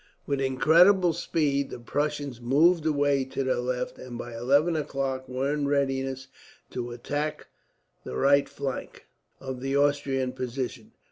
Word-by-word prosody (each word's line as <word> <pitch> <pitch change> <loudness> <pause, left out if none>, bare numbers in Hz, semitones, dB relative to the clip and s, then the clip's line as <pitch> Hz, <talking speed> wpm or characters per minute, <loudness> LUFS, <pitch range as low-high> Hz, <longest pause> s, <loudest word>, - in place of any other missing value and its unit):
With 140 -1 -1
incredible 165 +8 +5
speed 145 -4 0
the - - -6
Prussians 145 0 -3
moved 160 +7 +3
away 145 -2 +2
to 135 +1 -3
their 130 0 +1
left, 125 0 -3
and 125 -2 -8
by 120 -1 -7
eleven 140 +8 +2
o'clock 135 -3 -3
were 130 +3 -1
in 145 -1 -1
readiness 135 -2 -1 0.4
to 120 -1 -4
attack 145 +5 -4 0.5
the 65 - -6
right 140 - +3
flank 135 -2 -5 0.3
of 130 -2 -6
the 135 +1 0
Austrian 140 -2 +1
position. 130 0 -5
135 Hz, 140 wpm, -27 LUFS, 130-145 Hz, 0.5 s, incredible